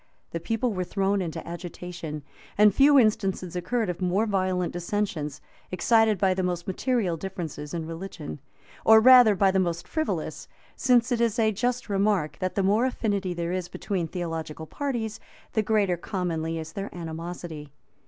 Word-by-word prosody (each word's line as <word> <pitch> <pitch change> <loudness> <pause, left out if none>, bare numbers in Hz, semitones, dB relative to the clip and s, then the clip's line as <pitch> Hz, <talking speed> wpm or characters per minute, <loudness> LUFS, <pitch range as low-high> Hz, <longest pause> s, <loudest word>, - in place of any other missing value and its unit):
The 170 - -3
people 225 +5 -1
were 185 -1 -1
thrown 195 +2 0
into 165 -4 -5
agitation; 170 -3 -6 0.3
and 210 -1 +6
few 280 +5 +6
instances 195 -6 +1
occur 230 +7 -1
of 180 -3 -3
more 185 +4 +2
violent 185 -3 0
dissensions, 175 -5 -3 0.3
excited 220 +2 +3
by 190 0 +3
the 185 - -1
most 180 -1 -2
material 195 -3 0
differences 160 -5 -6
in 165 -2 -3
religion; 165 -3 -7 0.4
or 220 0 +8
rather 245 -2 +8
by 195 0 +4
the 190 - +2
most 170 -2 -1
frivolous; 315 0 -3 0.3
since 245 -2 +3
it 235 -1 +1
is 230 -1 +1
a 220 -2 +3
just 245 +4 -1
remark, 200 -5 +1
that 185 0 -2
the 195 - +1
more 210 +6 +3
affinity 200 -7 -1
there 170 0 -2
is 185 -1 -2
between 180 -2 -3
theological 165 -2 -5
parties, 235 - -3 0.3
the 220 - +2
greater 200 -4 +1
commonly 165 -3 -2
is 160 0 -6
their 200 0 -4
animosity. 165 -2 -6
185 Hz, 165 wpm, -26 LUFS, 170-215 Hz, 0.4 s, or